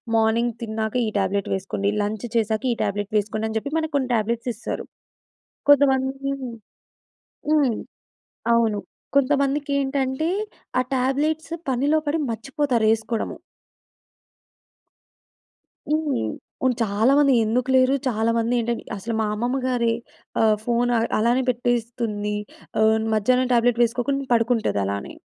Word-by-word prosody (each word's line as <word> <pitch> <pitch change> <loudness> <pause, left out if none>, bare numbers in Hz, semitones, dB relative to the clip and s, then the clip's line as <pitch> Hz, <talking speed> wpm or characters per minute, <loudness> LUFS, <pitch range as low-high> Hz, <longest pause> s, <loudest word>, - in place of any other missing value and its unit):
Morning 225 +1 +2
తిన్నాక, 220 0 -3
ఈ - - 0
tablet 195 +1 -1
వేసుకోండి, 195 +1 -2
లంచ్ 210 +3 -3
చేశాక 220 0 +1
ఈ - - -5
టాబ్లెట్ 205 +1 -3
వేసుకోండి, 215 +2 -1
అని 220 - -2
జెప్పి 280 +7 -6
మనకు 315 0 -4
కొన్ని 260 -2 -1
టాబ్లెట్స్ 230 +3 -1
ఇస్తారు. 235 - -5 0.8
కొంతమంది 270 -1 +3 1.2
హ్మ్. 285 -7 +3 0.8
అవును. 225 -3 +2 0.4
కొంతమందికేంటంటే, 280 +1 +1 0.5
ఆ - - +3
టాబ్లెట్స్ 300 +6 0 0.2
పనిలో 285 +5 +2
పడి 315 - +1
మర్చిపోతారు 255 0 -1
యేసుకోడము. 225 0 -2 2.5
హ్మ్. 300 - 0 0.4
ఉన్ 255 - +4
చాలామంది 260 +7 +4
ఎందుకు 245 +4 0
లేరు. 260 +1 +5
చాలామంది 230 0 +1
ఏంటంటె 235 0 -2
అసలు 200 +4 -4
మా 220 - +1
అమ్మమ్మ 245 +5 -1
గారి 235 -2 +1 0.5
ఆహ్, 220 -1 +5
ఫోన్ 240 0 +1
అ - - +3 0.2
అలానే 240 +4 +3
పెట్టేస్తుంది. 235 -3 -1 0.5
ఆహ్, 220 0 +5 0.2
మధ్యాహ్నం 250 +4 +2
టాబ్లెట్ 240 0 +3
వేసుకోకుండా 255 +4 0
పడుకుంటదలానే. 215 - 0
240 Hz, 110 wpm, -23 LUFS, 220-270 Hz, 2.5 s, లేరు